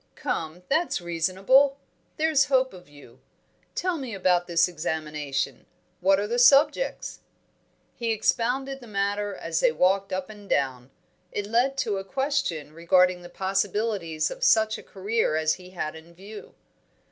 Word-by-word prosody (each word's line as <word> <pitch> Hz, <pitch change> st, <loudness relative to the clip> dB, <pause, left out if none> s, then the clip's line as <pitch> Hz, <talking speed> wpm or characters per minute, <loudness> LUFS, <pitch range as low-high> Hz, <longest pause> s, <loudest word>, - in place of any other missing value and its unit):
"Come, 165 Hz, +3 st, -4 dB
that's 325 Hz, -, +1 dB
reasonable! 190 Hz, -, +2 dB, 0.4 s
There's 310 Hz, -3 st, +3 dB
hope 260 Hz, -3 st, +2 dB
of 180 Hz, -4 st, -14 dB
you. 140 Hz, -4 st, -16 dB, 0.6 s
Tell 360 Hz, -3 st, -1 dB
me 250 Hz, -6 st, -5 dB
about 180 Hz, -2 st, +2 dB
this 170 Hz, 0 st, +3 dB
examination. 150 Hz, -5 st, -3 dB, 0.3 s
What 195 Hz, +2 st, +3 dB
are 205 Hz, -, -1 dB
the 235 Hz, +3 st, -1 dB
subjects?" 285 Hz, -, +3 dB, 0.8 s
He 235 Hz, -1 st, -3 dB
expounded 250 Hz, +5 st, 0 dB
the 240 Hz, -, -12 dB
matter 205 Hz, 0 st, -1 dB
as -, -, -2 dB
they -, -, +4 dB
walked 195 Hz, -, +1 dB
up 185 Hz, 0 st, -3 dB
and 205 Hz, -2 st, -13 dB
down. 130 Hz, -2 st, -1 dB, 0.4 s
It 205 Hz, -, -3 dB
led 245 Hz, +6 st, +1 dB
to 210 Hz, -6 st, 0 dB
a 195 Hz, -, -4 dB
question 265 Hz, -, -2 dB
regarding 180 Hz, +2 st, +3 dB
the 175 Hz, -, -11 dB
possibilities 195 Hz, -3 st, -1 dB
of -, -, -7 dB
such 220 Hz, -, +3 dB
a -, -, -12 dB
career 205 Hz, -3 st, -1 dB
as 155 Hz, 0 st, +2 dB
he 180 Hz, -, -12 dB
had 170 Hz, -4 st, -4 dB
in 165 Hz, +2 st, -14 dB
view. 205 Hz, +4 st, -11 dB
195 Hz, 150 wpm, -26 LUFS, 170-245 Hz, 0.8 s, they